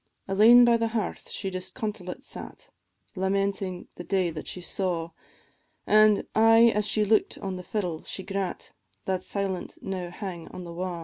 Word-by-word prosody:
Alane 225 Hz, +5 st, +7 dB
by 235 Hz, -1 st, +5 dB
the 230 Hz, 0 st, 0 dB
hearth 210 Hz, -, -4 dB
she 195 Hz, -2 st, -4 dB
disconsolate 185 Hz, 0 st, -5 dB
sat, -, -, -8 dB, 0.5 s
Lamenting 190 Hz, -1 st, -1 dB
the -, -, -6 dB
day 185 Hz, -2 st, 0 dB
that 155 Hz, -1 st, -7 dB
she -, -, -6 dB
saw, 175 Hz, -2 st, -2 dB, 0.7 s
An' 215 Hz, -1 st, +5 dB
aye 225 Hz, +1 st, +6 dB
as 210 Hz, 0 st, +1 dB
she 210 Hz, +1 st, +2 dB
look'd 215 Hz, +1 st, +2 dB
on 190 Hz, -1 st, -4 dB
the 180 Hz, -, -6 dB
fiddle 180 Hz, -4 st, -3 dB
she 190 Hz, -, -5 dB
grat, 195 Hz, -2 st, -4 dB, 0.3 s
That 190 Hz, -1 st, -1 dB
silent 195 Hz, -3 st, -3 dB
now 185 Hz, -2 st, -4 dB
hang 180 Hz, -2 st, -7 dB
on 180 Hz, -, -8 dB
the 170 Hz, -1 st, -8 dB
wa'. 180 Hz, 0 st, -4 dB
195 Hz, 165 wpm, -27 LUFS, 180-210 Hz, 0.7 s, Alane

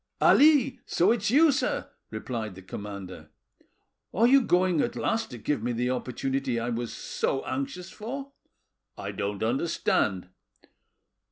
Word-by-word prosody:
"Ali! 285 Hz, -3 st, +5 dB
so 180 Hz, +5 st, +3 dB
it's 215 Hz, -3 st, +1 dB
you, 300 Hz, +6 st, +6 dB
sir," 280 Hz, -, -1 dB, 0.2 s
replied 110 Hz, -6 st, -5 dB
the 95 Hz, -, -11 dB
commander. 100 Hz, 0 st, -8 dB, 0.8 s
"Are 225 Hz, +5 st, +3 dB
you 270 Hz, +3 st, +6 dB
going 180 Hz, -, +2 dB
at -, -, -1 dB
last 225 Hz, 0 st, -1 dB
to 125 Hz, -, -8 dB
give 130 Hz, +2 st, -1 dB
me 120 Hz, +2 st, -1 dB
the 125 Hz, +2 st, 0 dB
opportunity 130 Hz, 0 st, -2 dB
I 115 Hz, +1 st, -2 dB
was 120 Hz, 0 st, -3 dB
so 135 Hz, -, -2 dB
anxious 140 Hz, +8 st, -4 dB
for?" 270 Hz, +6 st, -6 dB, 0.7 s
"I -, -, -5 dB
don't 100 Hz, 0 st, -3 dB
understand." 110 Hz, -, 0 dB
135 Hz, 140 wpm, -27 LUFS, -, 0.8 s, you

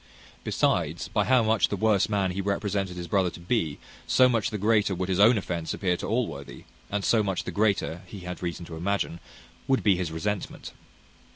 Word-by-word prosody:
Besides, -, -, 0 dB
by -, -, +1 dB
how 130 Hz, -2 st, +4 dB
much 110 Hz, -1 st, +3 dB
the -, -, -1 dB
worse 105 Hz, 0 st, +2 dB
man 100 Hz, -3 st, +1 dB
he 95 Hz, +2 st, -3 dB
represented 100 Hz, -2 st, -2 dB
his 85 Hz, -1 st, -5 dB
brother 95 Hz, 0 st, +2 dB
to 85 Hz, -, -11 dB
be, 85 Hz, -4 st, -1 dB, 0.3 s
so 130 Hz, -, +5 dB
much 120 Hz, -1 st, +1 dB
the 110 Hz, -, -3 dB
greater 105 Hz, -1 st, +2 dB
would 90 Hz, +1 st, -3 dB
his 95 Hz, 0 st, 0 dB
own 110 Hz, +3 st, +6 dB
offence 85 Hz, -4 st, -3 dB
appear 90 Hz, -3 st, 0 dB
to -, -, -5 dB
Allworthy, 110 Hz, -, -3 dB, 0.3 s
and 100 Hz, -1 st, -2 dB
so 115 Hz, -, +4 dB
much 95 Hz, -3 st, -1 dB
the -, -, -5 dB
greater, 100 Hz, -5 st, 0 dB
he 95 Hz, +2 st, -9 dB
had 90 Hz, 0 st, -7 dB
reason 85 Hz, -1 st, -4 dB
to 85 Hz, -1 st, -8 dB
imagine, 90 Hz, -1 st, -1 dB, 0.5 s
would 135 Hz, -1 st, +2 dB
be 100 Hz, -3 st, +5 dB
his 90 Hz, -3 st, -2 dB
resentment. 100 Hz, +5 st, -4 dB
100 Hz, 200 wpm, -27 LUFS, 90-105 Hz, 0.5 s, own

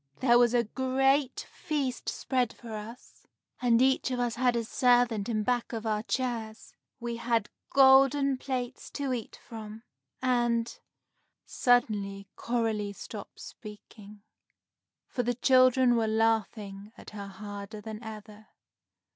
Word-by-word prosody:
There 240 Hz, -2 st, +5 dB
was 240 Hz, 0 st, +4 dB
a 240 Hz, -, +4 dB
great 265 Hz, +3 st, +1 dB
feast 275 Hz, -5 st, -3 dB
spread 250 Hz, -3 st, -1 dB
for 230 Hz, -2 st, -10 dB
us, 220 Hz, +4 st, -10 dB, 0.3 s
and 235 Hz, -2 st, +4 dB
each 265 Hz, 0 st, +2 dB
of 250 Hz, -1 st, -2 dB
us 240 Hz, -1 st, 0 dB
had 245 Hz, 0 st, +1 dB
a 235 Hz, -, 0 dB
servant 245 Hz, -3 st, +2 dB
in 215 Hz, -2 st, 0 dB
back 245 Hz, +1 st, -1 dB
of 225 Hz, 0 st, -4 dB
our 215 Hz, -1 st, 0 dB
chairs. 230 Hz, -2 st, -4 dB, 0.3 s
We 235 Hz, 0 st, -4 dB
had 230 Hz, -3 st, 0 dB, 0.2 s
golden 270 Hz, 0 st, +5 dB
plates 255 Hz, -2 st, -4 dB
to 275 Hz, -3 st, -2 dB
eat 235 Hz, -4 st, -5 dB
from, 220 Hz, -1 st, -9 dB, 0.4 s
and 240 Hz, -2 st, +1 dB, 0.4 s
" -, -, -45 dB, 0.2 s
Suddenly 205 Hz, -5 st, +1 dB
Coralie 220 Hz, -4 st, -1 dB
stopped -, -, -9 dB
speaking, 210 Hz, -1 st, -12 dB, 0.8 s
for 245 Hz, -, -2 dB
the 245 Hz, 0 st, -1 dB
children 255 Hz, 0 st, +5 dB
were 225 Hz, -1 st, +1 dB
laughing 215 Hz, -2 st, -1 dB
at -, -, -12 dB
her 200 Hz, -1 st, -7 dB
harder 205 Hz, +1 st, -8 dB
than 215 Hz, +1 st, -8 dB
ever. 215 Hz, -1 st, -10 dB
235 Hz, 135 wpm, -29 LUFS, 215-255 Hz, 0.8 s, There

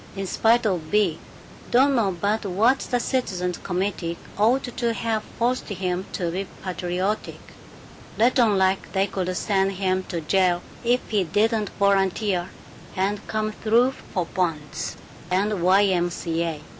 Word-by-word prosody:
In 195 Hz, 0 st, -3 dB
spite 230 Hz, +5 st, +3 dB
of 175 Hz, -6 st, -1 dB
Bea, 205 Hz, -5 st, +2 dB, 0.5 s
don't 270 Hz, +3 st, +4 dB
know 195 Hz, -7 st, +1 dB
but 210 Hz, +3 st, 0 dB
what 215 Hz, +7 st, +3 dB
the 245 Hz, -, -1 dB
citizens' 185 Hz, -9 st, -1 dB
committee 180 Hz, -2 st, -2 dB, 0.2 s
ought 235 Hz, +6 st, +3 dB
to 235 Hz, -2 st, 0 dB
have 225 Hz, -1 st, -1 dB, 0.2 s
forced 245 Hz, +2 st, 0 dB
him 185 Hz, -1 st, -2 dB
to 175 Hz, -3 st, -1 dB
be 190 Hz, +2 st, -3 dB, 0.2 s
patriotic 185 Hz, +2 st, -2 dB, 0.8 s
let 245 Hz, +4 st, +3 dB
on 220 Hz, -5 st, +4 dB
like 190 Hz, 0 st, +1 dB
they 195 Hz, 0 st, +2 dB
could 185 Hz, -2 st, -3 dB
send 195 Hz, -1 st, +1 dB
him 185 Hz, -1 st, 0 dB
to 175 Hz, -, -3 dB
jail 180 Hz, +2 st, +2 dB, 0.2 s
if 245 Hz, +1 st, +2 dB
he 205 Hz, -3 st, +2 dB
didn't 215 Hz, +4 st, +1 dB
volunteer 195 Hz, -2 st, +1 dB, 0.5 s
and 200 Hz, +2 st, -1 dB
come 215 Hz, 0 st, -1 dB
through 230 Hz, +4 st, +2 dB, 0.2 s
for 180 Hz, -3 st, -1 dB
bonds 160 Hz, -5 st, -3 dB, 0.3 s
and 195 Hz, +3 st, +1 dB
the 210 Hz, -, -1 dB
Y. 185 Hz, +3 st, +4 dB
M. 180 Hz, -3 st, +2 dB
C. 165 Hz, -1 st, -3 dB
A. 165 Hz, -3 st, -2 dB
195 Hz, 155 wpm, -24 LUFS, 180-220 Hz, 0.8 s, don't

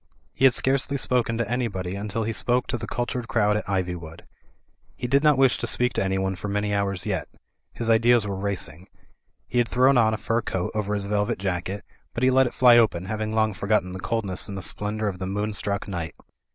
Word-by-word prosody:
He 135 Hz, -, +2 dB
had 130 Hz, -3 st, +6 dB
scarcely 135 Hz, +1 st, +1 dB
spoken 120 Hz, -3 st, 0 dB
to 115 Hz, -2 st, -1 dB
anybody 105 Hz, -7 st, -2 dB
until 105 Hz, +2 st, -2 dB
he 115 Hz, +1 st, -2 dB
spoke 120 Hz, +3 st, +1 dB
to -, -, -3 dB
the 115 Hz, -, -6 dB
cultured 120 Hz, -1 st, -3 dB
crowd 105 Hz, -3 st, +2 dB
at 105 Hz, -, -3 dB
Ivjrwood. 90 Hz, -4 st, -3 dB, 0.7 s
He -, -, -5 dB
did 135 Hz, +3 st, +3 dB
not 150 Hz, -2 st, +5 dB
wish 135 Hz, -2 st, +3 dB
to 120 Hz, -, -2 dB
speak 125 Hz, +1 st, +2 dB
to -, -, 0 dB
anyone 95 Hz, 0 st, -1 dB
for 90 Hz, -, -6 dB
many 105 Hz, 0 st, -1 dB
hours 100 Hz, -2 st, 0 dB
yet. -, -, -2 dB, 0.5 s
His 115 Hz, -, -4 dB
ideas 115 Hz, 0 st, +4 dB
were 100 Hz, -1 st, -3 dB
racing. 95 Hz, -3 st, -3 dB, 0.6 s
He 125 Hz, -, 0 dB
had 120 Hz, -2 st, +1 dB
thrown 130 Hz, +1 st, +4 dB
on 110 Hz, -1 st, +3 dB
a -, -, -5 dB
fur 115 Hz, +2 st, -1 dB
coat 95 Hz, -4 st, -3 dB
over 105 Hz, -1 st, -1 dB
his 100 Hz, -1 st, -3 dB
velvet 105 Hz, 0 st, 0 dB
jacket, 95 Hz, +1 st, -3 dB, 0.3 s
but 120 Hz, -, -2 dB
he 130 Hz, -, +5 dB
let 130 Hz, 0 st, +4 dB
it -, -, -6 dB
fly 120 Hz, -2 st, +7 dB
open, 95 Hz, -6 st, +1 dB
having 110 Hz, +2 st, -3 dB
long 110 Hz, -1 st, +2 dB
forgotten 100 Hz, -1 st, 0 dB
the 95 Hz, -, -6 dB
coldness 100 Hz, -2 st, 0 dB
in 100 Hz, -, -5 dB
the 95 Hz, -, -5 dB
splendour 105 Hz, +3 st, 0 dB
of 95 Hz, -3 st, -4 dB
the 95 Hz, -, -4 dB
moonstruck 105 Hz, 0 st, -2 dB
night. 85 Hz, -5 st, -5 dB
105 Hz, 220 wpm, -24 LUFS, 95-120 Hz, 0.7 s, fly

